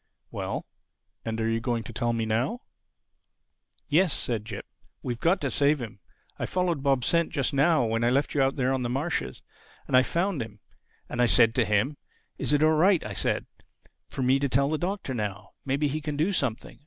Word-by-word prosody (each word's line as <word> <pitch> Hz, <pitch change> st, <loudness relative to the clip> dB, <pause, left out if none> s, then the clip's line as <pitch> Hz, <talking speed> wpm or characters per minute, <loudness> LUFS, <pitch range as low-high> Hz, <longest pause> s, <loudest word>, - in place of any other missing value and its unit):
"Well, -, -, -4 dB, 0.6 s
and 115 Hz, 0 st, -3 dB
are 110 Hz, -, 0 dB
you 115 Hz, 0 st, +1 dB
going 120 Hz, -1 st, -1 dB
to 115 Hz, -, -9 dB
tell 120 Hz, +1 st, 0 dB
me 115 Hz, -1 st, -1 dB
now?" 120 Hz, -, -1 dB, 1.3 s
"Yes," 170 Hz, +3 st, +3 dB
said 110 Hz, -4 st, -2 dB
Jip, 105 Hz, -3 st, -7 dB, 0.4 s
"we've 120 Hz, -2 st, -3 dB
got 175 Hz, +7 st, +2 dB
to 140 Hz, -3 st, -1 dB
save 145 Hz, +1 st, +3 dB
him. 115 Hz, -4 st, -7 dB, 0.4 s
I -, -, -2 dB
followed 180 Hz, -5 st, 0 dB
Bob's 135 Hz, -3 st, +2 dB
scent 170 Hz, -1 st, +2 dB
just 140 Hz, -5 st, -1 dB
now 145 Hz, -1 st, +3 dB
when 115 Hz, +1 st, 0 dB
I 120 Hz, -, +4 dB
left 140 Hz, +3 st, +1 dB
you 145 Hz, -, +2 dB
out 135 Hz, 0 st, +2 dB
there 130 Hz, -1 st, +1 dB
on 130 Hz, -, -1 dB
the 120 Hz, -, -2 dB
marshes. 135 Hz, -, -2 dB, 0.4 s
And -, -, 0 dB
I 130 Hz, -, +8 dB
found 170 Hz, +2 st, -1 dB
him. 110 Hz, -2 st, -7 dB, 0.5 s
And 125 Hz, -, -2 dB
I 120 Hz, -, +5 dB
said 115 Hz, -1 st, +5 dB
to 120 Hz, -1 st, +2 dB
him, 105 Hz, +8 st, +1 dB, 0.4 s
'Is -, -, -1 dB
it 145 Hz, +1 st, +3 dB
all 155 Hz, -, +5 dB
right,' 175 Hz, +3 st, +4 dB
I -, -, -5 dB
said, -, -, -1 dB, 0.6 s
'for 130 Hz, -, -3 dB
me 130 Hz, +2 st, +4 dB
to 140 Hz, 0 st, 0 dB
tell 140 Hz, +2 st, +2 dB
the 155 Hz, 0 st, -1 dB
Doctor 185 Hz, -6 st, -3 dB
now? 100 Hz, -5 st, -4 dB
Maybe 140 Hz, +2 st, +1 dB
he 155 Hz, +2 st, -2 dB
can 150 Hz, -1 st, -4 dB
do 160 Hz, +7 st, +2 dB
something. 125 Hz, -, -2 dB
135 Hz, 210 wpm, -27 LUFS, 115-155 Hz, 1.3 s, I